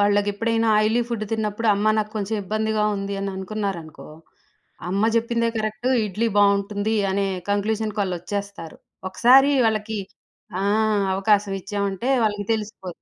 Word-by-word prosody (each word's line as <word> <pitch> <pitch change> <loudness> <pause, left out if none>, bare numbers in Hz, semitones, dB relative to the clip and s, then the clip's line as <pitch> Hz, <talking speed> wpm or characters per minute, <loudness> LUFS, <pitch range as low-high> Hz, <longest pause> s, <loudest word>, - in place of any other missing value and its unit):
వాళ్ళకెప్పుడైనా 205 +3 +1
oily 220 +3 +2
food 230 -3 -3
తిన్నప్పుడు 220 0 -1
అమ్మ 210 +2 +2
నాక్కొంచెం 215 0 -2
ఇబ్బందిగా 215 +2 -1
ఉంది 195 0 -4
అని 195 0 -2
అనుకున్నారనుకో, 190 -5 -5 0.8
"అమ్మ 195 +2 0
చెప్పిందే 230 0 +1
కరెక్టు 215 +3 -2 0.2
ఇడ్లీ 215 +4 -1
బావుంటుంది" 205 +1 +2 0.2
అనే 200 +1 0 0.2
కంక్లూజన్‌కాళ్ళొచ్చేస్తారు. 200 -3 -3 0.3
ఒకసారి 265 +7 +5
వాళ్ళకి 220 0 -1 0.6
ఆ! - - -1 0.5
అవకాశం 200 +1 +2
ఇచ్చామంటే 200 +3 -3 0.2
వాళ్ళకి 205 -1 -1
తెలిసిపో 210 -3 -4
210 Hz, 110 wpm, -23 LUFS, 200-220 Hz, 0.8 s, ఒకసారి